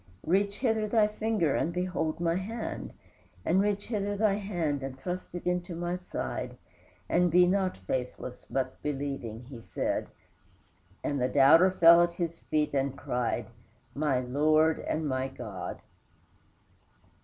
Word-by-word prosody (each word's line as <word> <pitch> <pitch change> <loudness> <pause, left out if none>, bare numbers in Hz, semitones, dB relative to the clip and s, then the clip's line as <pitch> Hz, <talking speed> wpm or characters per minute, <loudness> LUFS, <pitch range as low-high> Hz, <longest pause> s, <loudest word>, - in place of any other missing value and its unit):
"Reach 200 +4 +1
hither 225 -4 +1
thy 215 -1 +4
finger 210 -7 0
and 165 - 0
behold 170 -3 -2
my 170 -1 +1
hand, 215 +6 -4 0.5
and 185 +4 +3
reach 205 0 0
hither 205 -2 -1
thy 210 -1 +3
hand 175 -8 -2
and 135 -1 -6
thrust 180 +5 -5
it 175 - -6
into 180 -1 -1
my 175 +1 -2
side, 180 0 -5 0.5
and 175 0 +3
be 180 +2 +6
not 190 0 +1
faithless 125 +5 -4
but 135 -1 -2
believing," 135 -6 -4
he 120 -2 -10
said, - - -2 1.0
and 140 -2 -1
the 125 - +2
doubter 150 +7 +7
fell 170 -2 +7
at 175 0 +2
his 170 -1 -3
feet 150 -1 -1
and 135 0 0
cried, 120 -1 -1 0.5
"My 145 -3 +1
Lord 155 +5 +3
and 155 -1 -2
my 130 -1 -1
God!" 100 -9 -7
165 Hz, 145 wpm, -29 LUFS, 135-185 Hz, 1.0 s, doubter